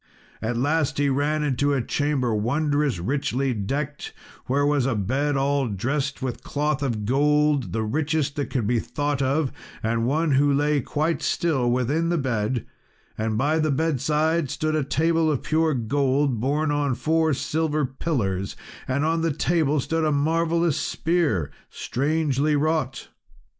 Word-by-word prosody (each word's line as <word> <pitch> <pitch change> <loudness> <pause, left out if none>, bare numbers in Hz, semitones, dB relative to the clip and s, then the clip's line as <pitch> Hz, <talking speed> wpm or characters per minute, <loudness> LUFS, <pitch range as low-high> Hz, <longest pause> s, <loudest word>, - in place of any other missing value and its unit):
At 115 +2 -2
last 145 +2 +1
he 145 0 +2
ran 145 +3 0
into 145 0 +1
a 135 - +1
chamber 140 -3 0
wondrous 145 - 0
richly 135 +6 -1
decked, 140 +8 -4 0.3
where 140 +3 +2
was 145 -3 +2
a 130 - 0
bed 135 +8 0
all 140 -1 +1
dressed 135 +7 -2
with 125 -2 -3
cloth 150 -1 -1
of 115 -7 -2
gold, 150 +2 +2
the 110 0 -1
richest 145 +4 -1
that 140 -4 -2
could 125 -5 -1
be 120 +2 +2
thought 145 +2 -2
of, 135 +1 +1 0.3
and 115 +1 0
one 155 +4 +1
who 140 +2 +4
lay 145 +1 +2
quite 155 +6 -1
still 135 -8 +1
within 135 +7 +1
the 175 - +1
bed; 125 -3 -1 0.5
and 110 0 -1
by 150 +6 +1
the 155 0 +1
bedside 155 +1 +1
stood 155 +3 -1
a 155 - +1
table 160 +3 +1
of 145 -4 -1
pure 160 -1 +1
gold 135 +1 +1
borne 145 +5 0
on 145 -3 0
four 160 +3 +1
silver 155 0 0
pillars, 115 - -2 0.3
and 140 +3 0
on 165 +1 +1
the 165 0 +1
table 155 -1 +1
stood 160 +4 -1
a 155 - +2
marvellous 165 +2 +1
spear, 155 - 0 0.2
strangely 150 +1 0
wrought. 150 -3 -1
145 Hz, 155 wpm, -24 LUFS, 130-155 Hz, 0.5 s, who